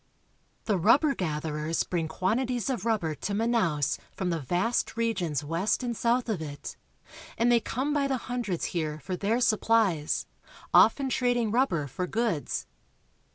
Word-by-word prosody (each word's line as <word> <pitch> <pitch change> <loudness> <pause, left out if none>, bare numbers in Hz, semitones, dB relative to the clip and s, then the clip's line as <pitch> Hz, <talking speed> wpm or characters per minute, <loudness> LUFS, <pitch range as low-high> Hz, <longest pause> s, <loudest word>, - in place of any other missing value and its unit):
The 205 -4 +1
rubber 275 - +4
gatherers 155 - -2
bring 170 -3 -2
quantities 240 +10 -1
of 230 -5 -3
rubber 195 -9 0
to 185 +7 -4
Manaos 205 - +1
from 185 -2 -2
the 165 - -1
vast 180 - -1
regions 185 - -1
west 170 - 0
and 240 -1 -2
south 240 +2 +1
of 210 -8 -2
it, 145 -2 -7 0.6
and 235 +1 +3
they 240 - +5
come 260 +6 -2
by 285 -2 +1
the 270 -1 0
hundreds 235 -8 -3
here 155 -3 -2
for 185 - -4
their 210 +6 0
supplies, 215 -8 +2 0.5
often 280 - +6
Wharves, 265 - -2
Manaos. - - +2
trading 245 -3 +1
rubber 225 - +1
for 180 +7 -4
goods. 220 -7 -1
210 Hz, 155 wpm, -28 LUFS, 165-240 Hz, 0.6 s, often